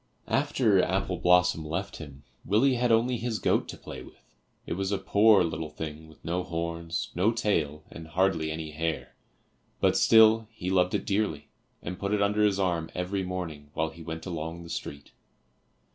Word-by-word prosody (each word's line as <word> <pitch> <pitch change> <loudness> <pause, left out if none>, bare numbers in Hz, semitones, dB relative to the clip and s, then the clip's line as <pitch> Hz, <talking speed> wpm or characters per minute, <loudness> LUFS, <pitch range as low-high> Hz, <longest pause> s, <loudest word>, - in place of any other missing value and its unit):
After 130 -8 +2
Apple 95 -1 -1
blossom 90 -2 +3
left 90 +6 -4
him, 70 -3 -11 0.2
Willie 115 +8 +3
had 125 -1 +1
only 120 +2 +3
his 115 -1 -2
goat - - +1
to - - -8
play - - -9
with; - - -15 0.4
it - - -3
was 95 +2 -2
a 100 - +1
poor 100 +1 +5
little 80 -1 -3
thing 75 0 -7
with 80 - -19
no 90 +2 -1
horns, 85 -1 -4
no 95 +6 +2
tail 80 -10 -1
and 80 -1 -9
hardly 85 -1 +1
any 80 0 -5
hair, 80 +1 -3 0.7
but - - +3
still 110 0 +6
he 95 -5 -5
loved 90 -1 +2
it - - -2
dearly, 100 -8 -1 0.3
and 90 +2 -5
put 100 +1 0
it 105 - 0
under 105 +1 +2
his 100 -2 +2
arm 85 -4 0
every 90 +2 -2
morning 85 -6 -5
while 80 0 -1
he 80 +1 -13
went 80 0 -6
along 85 -1 -5
the 85 - -11
street. 70 -3 -6
90 Hz, 180 wpm, -28 LUFS, 80-100 Hz, 0.7 s, still